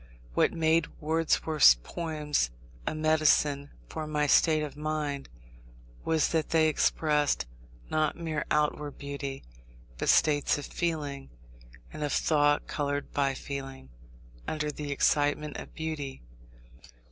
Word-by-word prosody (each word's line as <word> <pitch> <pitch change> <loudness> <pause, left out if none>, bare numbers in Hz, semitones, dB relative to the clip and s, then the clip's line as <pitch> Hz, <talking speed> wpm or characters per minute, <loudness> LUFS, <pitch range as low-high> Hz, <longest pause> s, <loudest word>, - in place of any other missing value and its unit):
What - - +3
made 160 -1 +2
Wordsworth's 155 - +4
poems 150 - -2 0.4
a - - -1
medicine 155 -2 +2 0.2
for 155 -1 -5
my 150 -1 0
state 155 +1 +4
of 145 -2 -6
mind, 150 -2 -3 0.7
was 160 -1 +2
that 160 -2 0
they 160 -1 +4
expressed, 150 - +1 0.5
not 155 0 +1
mere 160 -2 -2
outward 150 -1 0
beauty, 140 -1 -5 0.6
but - - 0
states 145 -2 +4
of 145 - -6
feeling, 145 -5 -3 0.6
and 150 - -5
of 145 - -1
thought 145 -2 +2
coloured 145 -1 -3
by 140 -1 +1
feeling, 135 - -7 0.6
under 150 -1 -2
the 145 -1 -6
excitement 145 +1 +1
of - - -10
beauty. 150 - -5
150 Hz, 120 wpm, -29 LUFS, 145-155 Hz, 0.7 s, Wordsworth's